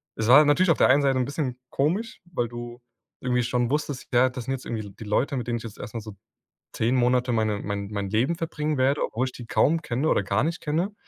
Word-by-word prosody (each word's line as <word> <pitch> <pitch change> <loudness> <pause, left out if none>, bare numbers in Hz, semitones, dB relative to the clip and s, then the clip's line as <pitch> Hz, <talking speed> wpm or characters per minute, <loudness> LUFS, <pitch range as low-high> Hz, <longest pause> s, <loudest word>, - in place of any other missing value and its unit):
es 110 0 -2
war 140 +5 +9
natürlich 165 +4 +4
auf - - +2
der - - +5
einen 140 +2 +5
Seite 135 -1 +2
'n 125 - +2
bisschen 140 -3 -3
komisch, 185 +12 -1
weil 120 - 0
du 120 0 -8 0.4
irgendwie 125 -1 +1
schon 120 0 0
wusstest, 145 -3 -2
ja, 125 +2 +5
das 125 -1 -6
sind 135 - -3
jetzt 130 - -6
irgendwie 110 -2 -3
L - - -11
die 110 - -7
Leute, 130 +6 0
mit 120 - -4
denen 120 -1 0
ich - - -11
jetzt 110 - -9
erst 110 - -8
mal 115 - -3
so 105 -2 -10 0.6
10 120 +4 +1
Monate 125 0 +2
meine 110 -2 0
mein 100 -1 -4
mein 100 -2 -3
Leben 120 - +1
verbringen 150 -2 -2
werde, 135 +3 +2
obwohl 125 +4 -2
ich 130 - -7
die 120 - -9
kaum 160 +7 +2
kenne 130 +2 -1
oder 100 - +2
gar 100 +5 +1
nicht 165 +1 -3
kenne. 170 +7 -1
125 Hz, 255 wpm, -25 LUFS, 115-145 Hz, 0.6 s, war